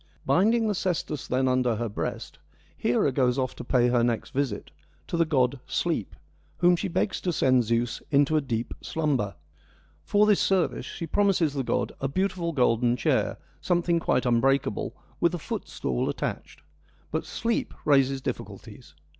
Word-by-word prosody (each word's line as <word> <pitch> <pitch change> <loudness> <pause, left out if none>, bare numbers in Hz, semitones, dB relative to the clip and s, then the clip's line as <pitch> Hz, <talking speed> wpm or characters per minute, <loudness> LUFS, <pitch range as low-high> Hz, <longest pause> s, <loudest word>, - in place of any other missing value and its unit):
Binding 220 - +3
the 210 - +1
cestus 175 -6 -2
then 130 +1 +1
under 125 -2 +2
her 115 +2 -2
breast, 105 - -5 0.4
Hera 120 +3 +1
goes 125 -1 +1
off 130 -2 -1
to - - -6
pay 125 0 +2
her 120 -1 +3
next 120 +3 -1
visit, 135 -6 -2 0.3
to - - -4
the 165 0 +3
god 130 -2 +1
Sleep, - - -1 0.4
whom 175 0 +5
she 195 - -2
begs 190 +2 -1
to 180 - 0
send 130 -6 +3
Zeus 115 +1 -1
into 145 +1 +3
a 155 - +3
deep 120 -4 -3
slumber. 140 -11 -1 0.7
For 205 +1 +3
this 210 -2 +4
service 190 -3 +1
she 165 - -5
promises 180 -4 +2
the 140 - -1
god 130 - -1
' - - -30
a 135 - 0
beautiful 180 +2 -1
golden 125 -3 +2
chair, - - +1 0.2
something 175 -1 +1
quite 130 - +1
unbreakable, 130 +3 +1 0.2
with - - +2
a - - -3
footstool 60 -2 -3
attached.' - - -5 0.5
But - - -1
Sleep 230 0 -1
raises 135 -2 +3
difficulties. 75 - -7
135 Hz, 165 wpm, -26 LUFS, 125-170 Hz, 0.7 s, whom